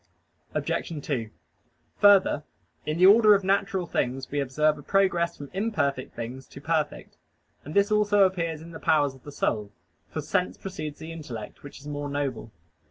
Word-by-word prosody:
Obj. 155 -5 -2
2: 120 -7 -2 0.7
Further, 200 -7 +5 0.4
in 155 +1 -1
the 180 - +6
order 210 +1 +8
of 200 - 0
natural 195 -1 +1
things 130 -4 -2
we 145 - -1
observe 150 +3 +1
a - - -9
progress 175 -1 +1
from 145 -1 -9
imperfect 155 - -1
things 125 +3 -6
to - - -11
perfect. 155 0 -2 0.5
And 150 - -8
this 200 +1 +3
also 205 -1 +4
appears 165 -4 0
in 170 - -11
the 160 - -9
powers 145 -3 +2
of 130 - -17
the 145 - -10
soul: 105 -7 -1 0.4
for - - -4
sense 90 +1 -1
precedes 155 -6 -6
the 160 +1 -8
intellect, 125 -10 -8
which 145 - -11
is 145 - -12
more 145 0 -4
noble. 140 -5 -3
155 Hz, 170 wpm, -26 LUFS, 140-190 Hz, 0.7 s, order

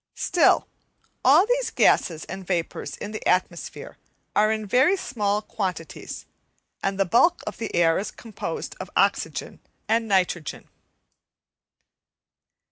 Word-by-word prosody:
Still, - - +3 0.6
all 300 +9 +6
these - - 0
gases 160 -3 +2
and 190 -2 -8
vapours 175 -3 -3
in 210 - -6
the 215 - -6
atmosphere 180 -1 -1 0.4
are 215 +1 +4
in 215 -1 -2
very 260 - +4
small 210 - -1
quantities, 180 -7 -5 0.6
and 195 0 -2
the 195 - +4
bulk 335 - +3
of - - -5
the 225 - -4
air 165 -1 +4
is 205 +2 -3
composed 225 -1 -6
of - - -6
oxygen - - 0 0.3
and 225 0 +1
nitrogen. 180 -6 0
205 Hz, 125 wpm, -24 LUFS, 180-235 Hz, 0.6 s, all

